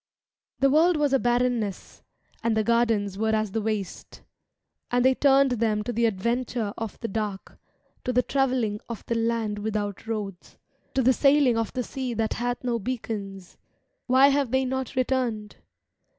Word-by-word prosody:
The 275 Hz, 0 st, +4 dB
world 330 Hz, +3 st, +4 dB
was 290 Hz, -2 st, +1 dB
a 270 Hz, -, +4 dB
barrenness. 240 Hz, -4 st, -1 dB, 0.4 s
And 230 Hz, -2 st, 0 dB
the 220 Hz, -, +2 dB
gardens 225 Hz, -4 st, +1 dB
were 220 Hz, 0 st, +1 dB
as 215 Hz, -2 st, -1 dB
the 225 Hz, -, -1 dB
waste. 210 Hz, -4 st, -4 dB, 0.7 s
And 245 Hz, 0 st, +2 dB
they 260 Hz, -, +6 dB
turned 275 Hz, 0 st, +4 dB
them 220 Hz, -3 st, 0 dB
to 240 Hz, -, -4 dB
the 235 Hz, +1 st, +2 dB
adventure 230 Hz, +1 st, -2 dB
of 225 Hz, -2 st, -6 dB
the 230 Hz, -, -2 dB
dark, 205 Hz, -2 st, -5 dB, 0.5 s
To 250 Hz, -, 0 dB
the 250 Hz, 0 st, +2 dB
travelling 255 Hz, -7 st, 0 dB
of 235 Hz, -, -7 dB
the -, -, -1 dB
land 225 Hz, -2 st, -1 dB
without 205 Hz, -1 st, -3 dB
roads, 205 Hz, -5 st, -5 dB, 0.4 s
To 265 Hz, -, +2 dB
the 260 Hz, +2 st, +5 dB
sailing 275 Hz, -2 st, +4 dB
of 225 Hz, -1 st, -1 dB
the 255 Hz, -, -2 dB
sea 255 Hz, -1 st, -4 dB
that 220 Hz, 0 st, 0 dB
hath 245 Hz, +1 st, -3 dB
no 240 Hz, -2 st, 0 dB
beacons. 200 Hz, -5 st, -5 dB, 0.5 s
Why 260 Hz, +2 st, +6 dB
have 280 Hz, -2 st, +1 dB
they 265 Hz, +2 st, +1 dB
not 265 Hz, +1 st, -3 dB
returned? 245 Hz, -5 st, -1 dB
235 Hz, 165 wpm, -26 LUFS, 215-255 Hz, 0.7 s, they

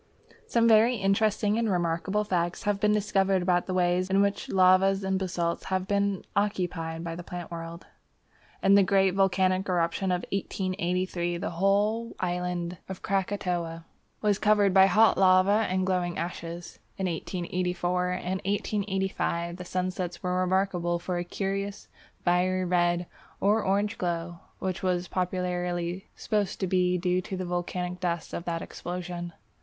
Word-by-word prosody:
Some 230 Hz, -1 st, +3 dB
very 225 Hz, +2 st, +5 dB
interesting 210 Hz, +1 st, +1 dB
and 230 Hz, -2 st, +1 dB
remarkable 180 Hz, +3 st, 0 dB
facts 175 Hz, -1 st, -1 dB
have 205 Hz, -2 st, 0 dB
been 210 Hz, 0 st, +3 dB
discovered 195 Hz, -3 st, +2 dB
about 175 Hz, -1 st, +1 dB
the 185 Hz, -, -2 dB
way 180 Hz, 0 st, +2 dB
in 195 Hz, +1 st, +3 dB
which 200 Hz, 0 st, -1 dB
lavas 190 Hz, +1 st, +4 dB
and 190 Hz, 0 st, 0 dB
basalts 175 Hz, -3 st, -2 dB
have 190 Hz, 0 st, -1 dB
been 200 Hz, -1 st, 0 dB
occupied 175 Hz, -5 st, -1 dB
by 165 Hz, -1 st, -4 dB
the 175 Hz, -, -6 dB
plant 175 Hz, 0 st, -7 dB
world. 165 Hz, 0 st, -7 dB, 0.8 s
In 195 Hz, 0 st, +5 dB
the 200 Hz, -, +7 dB
great 195 Hz, 0 st, +3 dB
volcanic 190 Hz, 0 st, +2 dB
eruption 180 Hz, +2 st, 0 dB
of 180 Hz, -1 st, -1 dB
1883, 185 Hz, -2 st, -1 dB
the 195 Hz, -, -3 dB
whole 205 Hz, +6 st, +1 dB
island 180 Hz, -1 st, -2 dB
of 190 Hz, -, -7 dB
Krakatoa 180 Hz, -4 st, -2 dB, 0.4 s
was 205 Hz, -2 st, +2 dB
covered 205 Hz, -2 st, +3 dB
by 190 Hz, 0 st, +7 dB
hot 220 Hz, 0 st, +4 dB
lava 190 Hz, +3 st, +5 dB
and 185 Hz, 0 st, 0 dB
glowing 180 Hz, -2 st, 0 dB
ashes. 170 Hz, 0 st, -6 dB, 0.2 s
In 190 Hz, -, -2 dB
1884 180 Hz, +1 st, -1 dB
and 185 Hz, +1 st, -2 dB
1885 190 Hz, -4 st, -1 dB
the 180 Hz, -, -7 dB
sunsets 180 Hz, -1 st, -3 dB
were 180 Hz, 0 st, 0 dB
remarkable 185 Hz, -2 st, +1 dB
for 175 Hz, +1 st, -3 dB
a -, -, -2 dB
curious 195 Hz, +2 st, -4 dB, 0.4 s
fiery 185 Hz, +1 st, +2 dB
red 175 Hz, 0 st, +1 dB, 0.3 s
or 210 Hz, +3 st, +3 dB
orange 205 Hz, +3 st, 0 dB
glow, 170 Hz, -1 st, -3 dB, 0.2 s
which 185 Hz, -1 st, -3 dB
was 180 Hz, -1 st, 0 dB
popularly 180 Hz, -1 st, -2 dB
supposed 205 Hz, -4 st, -1 dB
to 190 Hz, -, 0 dB
be 180 Hz, 0 st, +2 dB
due 180 Hz, +1 st, +1 dB
to 190 Hz, 0 st, -6 dB
the 185 Hz, -, -3 dB
volcanic 180 Hz, 0 st, -3 dB
dust 170 Hz, -2 st, -2 dB
of 170 Hz, -, -4 dB
that 165 Hz, -1 st, -2 dB
explosion. 175 Hz, -1 st, -6 dB
185 Hz, 150 wpm, -27 LUFS, 175-195 Hz, 0.8 s, the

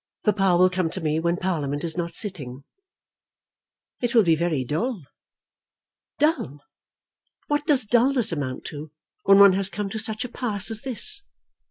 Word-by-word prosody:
Papa 195 Hz, -4 st, +3 dB
will 185 Hz, +1 st, +4 dB
come 180 Hz, -2 st, -1 dB
to 190 Hz, -, -5 dB
me 155 Hz, -2 st, -1 dB
when 170 Hz, +1 st, 0 dB
Parliament 150 Hz, -6 st, -2 dB
is 165 Hz, -2 st, -1 dB
not 170 Hz, -1 st, -4 dB
sitting." 140 Hz, -, -3 dB, 1.4 s
"It 245 Hz, -1 st, -1 dB
will 225 Hz, -, +7 dB
be 165 Hz, -3 st, +3 dB
very 160 Hz, -4 st, -1 dB
dull." 195 Hz, -, -2 dB, 1.1 s
"Dull! 290 Hz, -, 0 dB, 0.8 s
What 295 Hz, +1 st, -2 dB
does 275 Hz, -6 st, +2 dB
dulness 245 Hz, +1 st, +2 dB
amount 140 Hz, -5 st, -4 dB
to 150 Hz, +1 st, -8 dB, 0.4 s
when 195 Hz, 0 st, +6 dB
one 200 Hz, -1 st, +8 dB
has 195 Hz, 0 st, 0 dB
come 205 Hz, -1 st, -4 dB
to 220 Hz, -, -4 dB
such 220 Hz, +2 st, -2 dB
a -, -, -7 dB
pass 225 Hz, -4 st, -1 dB
as 220 Hz, -1 st, +1 dB
this? 405 Hz, -, -1 dB
190 Hz, 160 wpm, -24 LUFS, 160-230 Hz, 1.4 s, one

